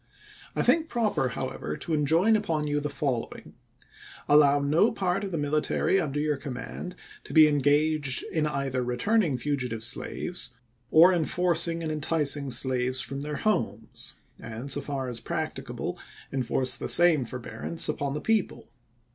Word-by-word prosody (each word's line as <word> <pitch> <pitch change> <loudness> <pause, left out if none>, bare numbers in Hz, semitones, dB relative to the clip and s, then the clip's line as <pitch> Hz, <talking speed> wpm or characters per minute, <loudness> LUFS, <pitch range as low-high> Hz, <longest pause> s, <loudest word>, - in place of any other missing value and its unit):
I - - +1
think 325 -1 +3
proper, 215 - 0
how - - -4
ever, 75 - -6
to 165 - -4
enjoin 165 +9 +3
upon 165 -8 -1
you 145 0 0
the 150 0 -3
following: 135 -4 -4 0.7
Allow 145 -1 +5
no 155 +10 +3
part 195 -2 -1
of 200 - -3
the 170 - -3
military 150 +5 +1
under 145 -3 -3
your 150 -1 0
command 140 +6 -7 0.3
to - - -9
be 155 -1 +8
engaged 145 -1 +2
in 155 -2 0
either 135 -3 -2
returning 150 - +1
fugitive 125 -5 -2
slaves 125 +1 -1 0.3
or 170 +4 +7
in 165 -3 +1
forcing 170 -1 +1
or 160 - -2
enticing 150 -2 0
slaves 130 0 +2
from 135 +1 -3
their 150 +1 -4
homes, 115 - -2 0.2
and, 120 +5 -6
so 145 - 0
far 135 -3 -4
as 120 -2 -5
practicable, 115 - -5 0.3
enforce 130 0 +1
the - - -4
same 170 -5 +5
forbearance 125 +6 -3
upon 140 -2 -2
the 150 - -4
people. 225 -1 -1
145 Hz, 155 wpm, -27 LUFS, 130-165 Hz, 0.7 s, be